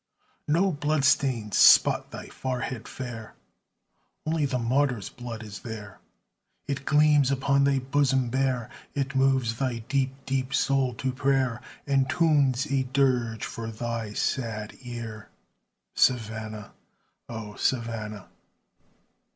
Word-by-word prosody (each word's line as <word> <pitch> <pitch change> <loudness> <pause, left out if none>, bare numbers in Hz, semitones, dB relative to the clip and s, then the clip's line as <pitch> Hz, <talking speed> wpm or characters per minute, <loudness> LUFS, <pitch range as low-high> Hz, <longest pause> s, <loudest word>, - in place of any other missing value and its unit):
No 175 +6 +3
blood 150 -2 0
stains 120 -7 +2
spot - - +6
thy - - -8
forehead 125 -2 -4
fair; 120 -4 -7 0.9
Only 155 -2 +1
the 130 -2 -1
martyrs' 125 -3 0
blood 120 -2 -7
is 105 -3 -8
there; 105 -4 -8 0.7
It 140 -1 -4
gleams 150 -2 +4
upon 140 0 +2
thy 140 -1 +3
bosom 135 -2 +1
bare, 130 -3 0 0.3
It 140 -1 -1
moves 130 -4 +2
thy 125 -4 -2
deep, 135 -1 0
deep 135 0 -1
soul 135 -3 +1
to 130 +3 -2
prayer, 130 -3 0 0.2
And 135 -2 +2
tunes 145 -5 +3
a 140 -2 0
dirge 125 -4 +1
for 115 0 -6
thy 115 -1 -4
sad 110 -4 -2
ear, 120 -3 -7 0.6
Savannah! 110 -3 0 0.6
O 110 -3 -6
Savannah! 110 -4 -2
130 Hz, 120 wpm, -27 LUFS, 115-140 Hz, 0.9 s, spot